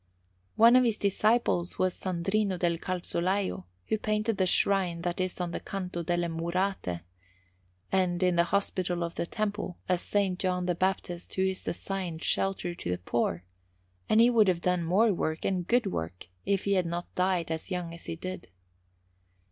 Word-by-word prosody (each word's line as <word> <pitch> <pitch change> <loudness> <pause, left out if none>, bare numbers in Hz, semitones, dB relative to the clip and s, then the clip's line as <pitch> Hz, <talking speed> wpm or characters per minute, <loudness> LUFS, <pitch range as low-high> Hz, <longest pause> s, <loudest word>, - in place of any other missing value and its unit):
One 230 +2 +7
of 255 - +7
his 230 -3 +1
disciples 200 -3 +1
was 185 -1 +2
Sandrino 190 +2 -1
del 170 -1 0
Calzolaio, 185 - -1 0.2
who 220 - 0
painted 215 0 0
the 185 - +3
shrine 180 -3 +2
that 175 +1 -1
is 185 0 -2
on 175 -1 -2
the - - -3
Canto 180 -3 -4
delle 175 +1 0
Murate, 170 - -2 0.9
and, 185 -1 +1
in 180 -1 +3
the 170 0 +4
Hospital 180 -2 0
of 170 0 -3
the 170 - -3
Temple, 205 -4 -3
a - - 0
S. 180 +3 -1 0.2
John 180 -1 0
the 180 - +1
Baptist 180 -1 -2
who 190 - +2
is 190 0 -2
assigning 185 -2 -3
shelter 180 +1 0
to 170 - -6
the 90 - 0
poor; 90 -2 -1 0.7
and 215 - +5
he 235 +2 +7
would 220 -4 +5
have 175 -2 +2
done 180 -1 +1
more 200 +6 +3
work, 160 -2 -2
and 185 -2 0
good 245 -1 +3
work, 90 - -4 0.2
if 195 -1 +1
he 200 - +1
had 185 -3 +2
not 175 +1 -4
died 180 -3 0
as 160 0 -4
young 180 -3 -3
as 170 - -11
he - - -3
did. 185 +1 -7
180 Hz, 180 wpm, -29 LUFS, 170-195 Hz, 0.9 s, One